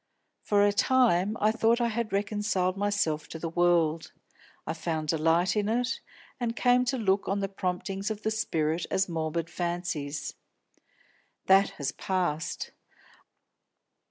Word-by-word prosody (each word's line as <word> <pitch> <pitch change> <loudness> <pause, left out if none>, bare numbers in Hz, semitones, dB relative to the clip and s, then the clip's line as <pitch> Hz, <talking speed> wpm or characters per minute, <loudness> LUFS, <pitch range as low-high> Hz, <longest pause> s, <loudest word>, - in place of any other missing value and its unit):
For 205 -1 +3
a 205 - +3
time 215 -3 +3
I 215 +1 +3
thought 225 +1 +2
I 235 -1 +1
had 230 0 -2
reconciled 200 -2 0
myself 200 -6 0
to - - -7
the 165 - -4
world; 165 -2 +2 0.5
I - - -2
found 160 -2 -3
delight 165 +4 +2
in 210 0 0
it, 245 +3 0 0.4
and 235 -2 -2
came 250 +1 +3
to 260 +1 0
look 195 -3 +1
on 200 +1 0
the 195 - -1
promptings 195 +1 -3
of 215 -1 -5
the 220 - 0
spirit 165 -6 -1
as 190 - +1
morbid 165 -1 -2
fancies. 170 -5 -3 1.1
That 195 +1 +5
has 140 -3 -2
passed. 180 -3 -2
190 Hz, 140 wpm, -28 LUFS, 165-215 Hz, 1.1 s, That